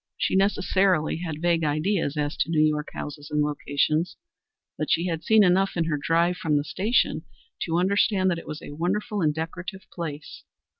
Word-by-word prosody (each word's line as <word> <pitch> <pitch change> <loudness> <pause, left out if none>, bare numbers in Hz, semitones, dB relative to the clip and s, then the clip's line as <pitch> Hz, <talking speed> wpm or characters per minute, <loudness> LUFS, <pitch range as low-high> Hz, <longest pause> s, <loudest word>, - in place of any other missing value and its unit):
She - - 0
necessarily 190 -4 +2
had 160 -2 -5
vague 170 -1 +2
ideas 155 +1 0
as 145 0 -1
to - - 0
New 155 -2 +3
York 150 -1 -1
houses 145 0 -7
and 150 -1 +1
locations, 150 +3 0 0.6
but 155 - -3
she 170 - +2
had 165 -3 -2
seen 220 +3 +5
enough 190 0 +2
in 170 - +2
her 155 -3 -1
drive 170 +3 +2
from 150 -4 +1
the 145 - 0
station 195 - +1 0.4
to 165 0 0
understand 190 +1 +2
that 170 - -1
it - - -13
was 155 0 -6
a - - -8
wonderful 200 +7 -2
and 155 -2 +3
decorative 170 +4 -6
place. 155 -4 -6
165 Hz, 185 wpm, -25 LUFS, 150-185 Hz, 0.6 s, seen